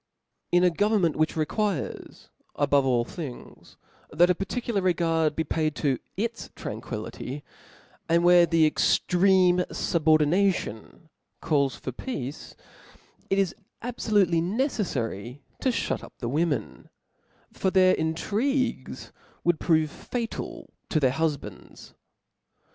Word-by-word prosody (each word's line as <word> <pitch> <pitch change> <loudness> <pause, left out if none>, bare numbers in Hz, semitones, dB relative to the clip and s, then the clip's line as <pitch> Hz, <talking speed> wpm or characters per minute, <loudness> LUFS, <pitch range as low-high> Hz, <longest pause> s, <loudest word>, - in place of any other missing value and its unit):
In 175 0 +4
a 180 - +5
government, 205 -3 +2
which 155 0 +1
requires, 170 +1 -3 0.3
above 140 -1 +2
all 120 -2 +2
things, 145 -3 -9 0.3
that 175 +4 +4
a - - +4
particular 205 +3 -2
regard 165 -4 +1
be 160 - 0
paid 155 -1 -1
to 135 -3 0 0.2
its 230 +3 -3
tranquility, 115 +5 -6 0.7
and 170 +1 +3
where 175 -1 +6
thecjctreme 180 +3 +3
fu'bofdination 160 - +1 0.3
calk 140 -4 +1
for 130 - -6
peace, 140 - -6 0.7
it 195 - +1
is 195 -3 +1 0.3
abfolutcly 205 -8 +1
neceffary 145 - -2 0.2
to 265 - +1
fliut 245 - -1
up - - -12
the 120 - -4
women; 145 -5 -2 0.6
for 190 - 0
their 185 0 +5
intrigues 215 - -1 0.3
Would 175 -2 +2
prove 160 -3 +2
faul 235 -2 -5 0.2
to 155 - +2
their 130 -3 +3
huf 155 0 0
bands. - - -12
165 Hz, 115 wpm, -26 LUFS, 145-190 Hz, 0.7 s, where